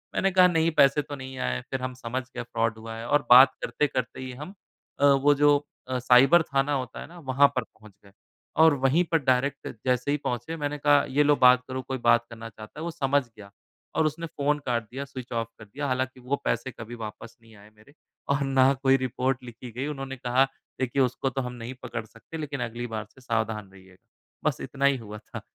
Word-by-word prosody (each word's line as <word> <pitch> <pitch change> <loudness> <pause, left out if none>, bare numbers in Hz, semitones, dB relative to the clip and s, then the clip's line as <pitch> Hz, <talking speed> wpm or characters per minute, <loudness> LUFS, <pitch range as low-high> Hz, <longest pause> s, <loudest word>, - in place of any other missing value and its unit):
मैंने 195 - +2
कहा, 185 0 +6
"नहीं, 165 -1 +2
पैसे 140 0 +5
तो 145 0 -7
नहीं 130 -1 -8
आए।" 60 0 -1
फिर 135 - -2
हम 130 0 -3
समझ 125 +1 -4
गए - - -3
फ़्रॉड 115 -1 -1
हुआ 115 0 -8
है 115 - -6
और 145 +3 +2
बात 130 +2 +9
करते-करते 130 -5 -1
ही 130 - -6
हम 180 +6 -8 0.5
अ, 145 - +4
वो 140 +1 +5
जो 145 0 +5 0.3
अ, 130 -1 -1
साइबर 130 +7 +6
थाना 140 0 0
होता 130 -3 -3
है - - -8
ना, 175 +1 -13
वहाँ 140 -1 +4
पर 125 - 0
पहुँच 110 -2 -19
गए, 100 - -17 0.4
और 160 -1 +6
वहीं 145 +7 +4
पर 165 - +5
डायरेक्ट 135 +2 +1 0.2
जैसे 125 +2 +1
ही 145 - +1
पहुँचे, 125 +7 -3
मैंने 145 -1 -3
कहा, 145 -1 +4
"ये 145 +3 +3
लो, 145 0 +4
बात 125 -1 +6
करो। 130 0 -4
कोई 130 +1 -4
बात 120 -1 +3
करना 115 -1 -9
चाहता 110 +6 -12
है।" 160 - -5
वो 170 - -3
समझ 145 -3 +1
गया 105 -4 -15 0.5
और 160 - +3
उसने 155 +2 -2
फ़ोन 150 -1 -1
काट 120 -2 0
दिया, 135 +3 -5
स्विच 130 -3 -9
ऑफ़ 115 -1 -1
कर 110 - -11
दिया। 140 +8 -5
हालाँकि 130 0 -2
वो 125 +3 -1
पैसे 130 - -1
कभी 120 0 -9
वापस 115 +1 -9
नहीं 115 -1 -18
आए 100 +1 -16
मेरे 110 +7 -20 0.4
और 140 +1 +2
ना 135 0 +4
कोई 135 0 +5
रिपोर्ट 130 0 -1
लिखी 120 0 -10
गई। 130 +5 -4
उन्होंने 135 -2 -5
कहा, 125 +2 +2 0.3
"देखिए, 130 +1 0
उसको 130 +1 0
तो 135 +1 -3
हम 125 -1 -5
नहीं 120 +1 -7
पकड़ 120 -3 -5
सकते, 115 +9 -11
लेकिन 140 -4 -4
अगली 120 +1 -5
बार 110 0 -4
से 130 - -17
सावधान 110 -4 -2
रहिएगा।" 95 -1 -19 0.4
बस - - -6
इतना 140 0 -2
ही 140 -1 +4
हुआ 105 -2 -9
था। - - -9
130 Hz, 225 wpm, -26 LUFS, 120-140 Hz, 0.5 s, बात